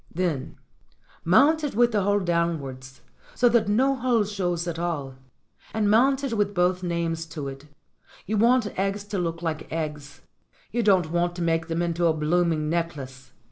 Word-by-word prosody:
"Then 165 -6 -2 0.7
mount 290 - +4
it 285 -7 -3
with 240 +1 +4
the 210 -2 +1
hole 205 +1 +2
downwards, 150 -7 -2 0.3
so 245 - +4
that 235 -3 +2
ho 260 +6 +3
hole 250 -4 +1
shows 180 -4 -2
at 165 -1 -4
all. 155 -6 -3 0.6
And 210 -2 +2
mount 265 +5 +3
it 270 -4 -2
with 205 -2 0
both 180 +1 +2
names 170 -2 -2
to 150 -4 -6
it. 135 +2 -9 0.6
You 215 +2 -1
want 230 -2 +2
eggs 195 +1 -1
to 205 -1 -4
look 165 -1 -3
like 160 -2 -4
eggs. 150 -3 -5 0.5
You 240 - 0
don't 190 -7 +3
want 175 0 0
to 175 - -3
make 165 -1 0
them 165 +1 -1
into 170 0 +1
a 160 - +3
blooming 155 0 +1
necklace. 140 -6 -4
175 Hz, 175 wpm, -25 LUFS, 160-205 Hz, 0.7 s, mount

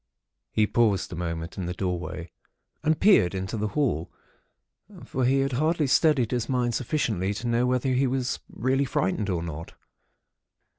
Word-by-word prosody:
"He 110 - +3
paused 105 -5 +1
a - - -4
moment 85 0 -4
in 90 - -3
the 90 - -4
doorway, 90 -2 -4 0.5
and 155 0 +1
peered 100 - +5
into 95 +4 -3
the 105 0 -1
hall; 95 - 0 0.9
for 130 -1 -1
he 135 +2 +3
had 135 0 0
hardly 155 +4 +1
steadied 135 -3 +3
his 120 -2 -1
mind 125 -2 +1
sufficiently 110 - -1
to 115 - -6
know 120 +1 +2
whether 125 +1 +1
he 130 +1 +2
was 130 -1 -1
really 130 +4 0
frightened 105 -4 -1
or 85 -3 -1
not. 85 -1 -7
120 Hz, 160 wpm, -26 LUFS, 90-130 Hz, 0.9 s, peered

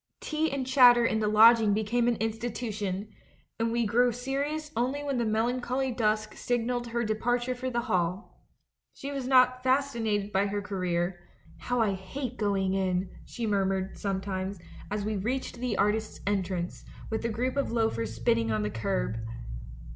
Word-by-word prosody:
Tea 315 +1 -1
and 270 -2 -2
chatter 245 -2 +7
in 220 -1 +1
the 215 - +1
lodging 220 0 +6
became 230 +3 +1
an 240 - +3
institution, 220 -3 -3 0.5
and 230 0 +1
we 235 0 +1
grew 245 +3 +3
serious 280 +5 -3
only 260 +5 0
when 280 -3 -1
the 235 - +1
melancholy 245 +4 0
dusk 215 -2 0
signalled 245 0 -1
her 235 0 -1
departure 240 +3 0
for 255 +1 -4
the 240 -1 -1
hall. 185 -4 -2 0.5
She 280 - -6
was 270 -3 -3
not 255 -1 +4
fasci 265 -1 +1
nated 205 -2 0
by 195 +1 +2
her 205 +1 -2
career: 180 -3 -2 0.4
'How 245 -1 0
I 215 -3 +3
hate 240 +7 -5
going 195 -3 +1
in!' 185 -1 0
she 235 - -5
murmured 195 -2 0
sometimes, 195 0 -3 0.3
as 205 0 -2
we 215 -1 -1
reached 245 +4 -3
the 245 -3 -1
artists' 210 +2 0
entrance, 185 -3 -2 0.3
with 220 - -1
the 230 - -1
group 250 +4 -1
of 280 -4 0
loafers 115 - 0
spitting 115 0 +1
on 105 -1 0
the 105 - -2
kerb. 110 - -1
220 Hz, 165 wpm, -28 LUFS, 195-245 Hz, 0.5 s, chatter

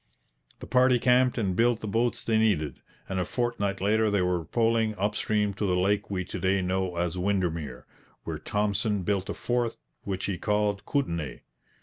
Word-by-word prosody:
The - - -6
party 125 0 +4
camped 125 +1 +3
and 95 -6 0
built 115 +1 +2
the 110 - -4
boats 115 +3 0
they 110 -1 +2
needed, 80 - +1 0.3
and 95 -1 -2
a - - +1
fortnight 100 -2 -1
later 110 +2 +3
they 100 -3 +2
were 90 -2 0
poling 115 -2 +1
up 105 +2 0
stream 105 -2 +1
to 100 +1 -2
the 90 - +2
lake 100 +2 +1
we 90 -2 -2
to 95 - -6
day 95 +1 +1
know 95 0 -1
as 85 +1 -1
Windermere, 85 -9 -1 0.4
where - - -4
Thompson 105 -1 0
built 100 -1 -1
a - - -3
fort 120 -1 -1 0.3
which 95 -1 -3
he 95 -4 -2
called 105 -1 0
'Kootenai.' 85 - -2
100 Hz, 185 wpm, -27 LUFS, 90-110 Hz, 0.4 s, party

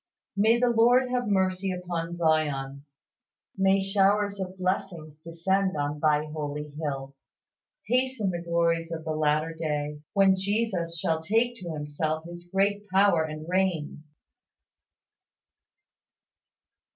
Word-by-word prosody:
May 220 +3 +4
the 245 0 +3
Lord 245 +2 +4
have 245 -2 0
mercy 190 -1 +1
upon 175 -2 -4
Zion. 145 -4 0 0.7
May 195 0 +3
showers 200 +1 +2
of 190 0 -5
blessing 185 -4 -2
descend 185 +2 0
on 145 +1 -2
Thy 150 0 +2
holy 150 -1 -5
hill. 140 -2 -5 0.7
Hasten 250 -3 0
the 175 -1 -4
glories 170 -1 0
of 160 -1 -5
the 160 - -2
latter 155 +1 +1
day, 150 -2 -3
when 195 -2 +5
Jesus 190 -4 -1
shall 160 0 0
take 225 +8 +1
to 175 -5 -6
Himself 155 +1 -3
His 175 0 -10
great 200 +1 +1
power 190 -3 +4
and 155 0 -6
reign! 180 -5 -1
175 Hz, 120 wpm, -27 LUFS, 155-195 Hz, 0.7 s, when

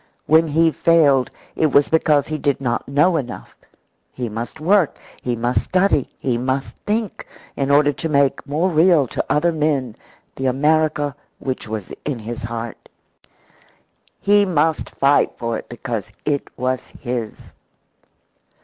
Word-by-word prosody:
When 160 +1 +4
he 160 +2 +3
failed, 145 -7 +3 0.3
it 160 - +2
was 145 0 +4
because 150 -3 +3
he 155 -1 -4
did 140 -2 0
not 120 -3 -2
know 150 +6 +3
enough; 130 -5 -6 0.6
he 125 -2 -4
must 115 +7 -6
work, 180 +1 +2 0.2
he 125 -1 -1
must 120 +2 0
study, 185 -7 +1
he 120 -3 -1
must 130 +2 -2
think, 215 -1 -2 0.3
in 135 -1 -1
order 145 +1 +4
to 160 +5 -4
make 140 -2 +2
more 160 +6 0
real 165 -2 +4
to - - -3
other 170 +3 +2
men 145 -7 -1 0.4
the 135 - -1
America 150 +1 +1 0.2
which 130 -4 -4
was 110 -3 -5
in 145 -4 -2
his 115 +1 -6
heart. 115 0 -6 1.3
He 205 0 +4
must 160 -4 +1
fight 140 +1 +2
for 115 -1 -2
it - - -13
because 120 -3 -5
it 145 -2 -1
was 130 0 -2
his. 120 -3 -6
140 Hz, 145 wpm, -20 LUFS, 125-160 Hz, 1.3 s, When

